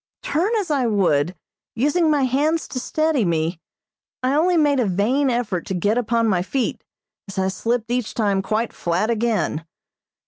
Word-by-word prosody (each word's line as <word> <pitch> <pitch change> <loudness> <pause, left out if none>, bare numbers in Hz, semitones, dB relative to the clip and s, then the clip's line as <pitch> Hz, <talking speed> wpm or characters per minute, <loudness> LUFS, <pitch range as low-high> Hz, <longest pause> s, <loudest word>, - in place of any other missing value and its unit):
Turn 340 +7 0
as 400 -7 -1
I 270 -4 +2
would, 180 -6 +1 0.4
using 295 +7 +2
my 295 -3 +2
hands 295 +6 +1
to 255 - -3
steady 310 -1 0
me, 165 -1 0 0.6
I 255 +1 +2
only 340 +4 +3
made 290 -3 +3
a 245 - +2
vain 235 +10 +1
effort 235 -8 -1
to 190 - -2
get 205 +5 +1
upon 230 -1 +1
my 185 -4 +2
feet, 240 +6 -2 0.4
as 195 - -9
I 190 0 +1
slipped 230 +3 -2
each 245 -2 -2
time 200 -4 +1
quite 220 +4 -1
flat 180 +7 0
again. 225 -8 0
235 Hz, 170 wpm, -22 LUFS, 195-280 Hz, 0.6 s, only